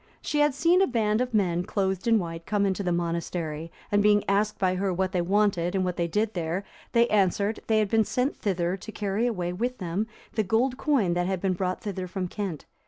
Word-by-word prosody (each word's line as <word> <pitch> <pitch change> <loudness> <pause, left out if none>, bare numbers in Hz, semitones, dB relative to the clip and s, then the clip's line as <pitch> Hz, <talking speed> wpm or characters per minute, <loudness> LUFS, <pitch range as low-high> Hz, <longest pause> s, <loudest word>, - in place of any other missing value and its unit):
She 295 - -2
had 295 -2 +3
seen 345 +5 +4
a 390 - +4
band 220 -2 +1
of 250 0 -1
men, 180 -6 +1
clothed 190 +1 -1
in 230 -1 +5
white, 165 -3 -5
come 205 -1 +1
into 195 0 0
the 180 -2 -1
monastery, 170 -2 -2 0.2
and 205 0 +4
being 205 0 +4
asked 205 +2 +1
by 185 -1 +1
her 190 +1 0
what 185 +1 0
they 180 -2 +1
wanted, 190 -1 +1
and 190 -1 +1
what 180 -1 -1
they 170 - 0
did 210 +6 0
there, 175 +2 -2 0.3
they 235 0 +5
answered, 205 +1 +2
"They 220 - +3
had 215 -2 +2
been 220 -1 +4
sent 255 +6 0
thither 180 -3 -1
to 220 - -9
carry 210 +2 -1
away 180 -6 -2
with 245 +7 -2
them 185 +4 -2 0.3
the 220 - +1
gold 225 +6 +1
coin 255 - +1
that 175 0 0
had 190 -1 -1
been 190 0 0
brought 185 0 -2
thither 190 -4 -4
from 185 0 -3
Kent." 190 -7 -4
195 Hz, 230 wpm, -27 LUFS, 180-220 Hz, 0.3 s, in